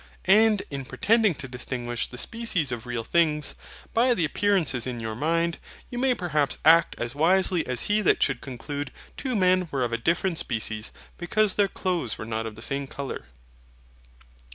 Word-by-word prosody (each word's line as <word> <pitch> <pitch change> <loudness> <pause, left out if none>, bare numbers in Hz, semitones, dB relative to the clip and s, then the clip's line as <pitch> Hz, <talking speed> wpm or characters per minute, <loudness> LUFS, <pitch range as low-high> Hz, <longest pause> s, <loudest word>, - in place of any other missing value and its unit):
And 210 +2 +5
in 140 -1 -4
pretending 215 - +2
to 130 - -7
distinguish 125 -1 -4
the 125 - -10
species 200 - -1
of 120 0 -5
real 120 -2 -3
things, 150 0 +2 0.4
by 240 +2 +4
the 170 - +1
appearances 155 - +1
in 125 -2 -4
your 110 -1 -4
mind, 165 +6 0 0.3
you 245 - -4
may 260 -1 +2
perhaps 155 - 0
act 165 +1 +6
as 120 +1 -3
wisely 175 +3 +2
as 125 -2 0
he 210 +1 +2
that 205 - +3
should 135 -4 0
conclude 140 +2 -5 0.2
two 260 -3 -3
men 185 -2 +3
were 135 -3 -1
of 120 -1 -2
a 115 - 0
different 170 +6 0
species, 110 -2 -2 0.3
because 205 +3 +2
their 205 -1 +3
clothes 175 - -2
were - - -6
not 110 0 -3
of 110 - -8
the 110 - -9
same 140 +1 -2
colour. 135 - -6
150 Hz, 175 wpm, -26 LUFS, 125-190 Hz, 0.4 s, act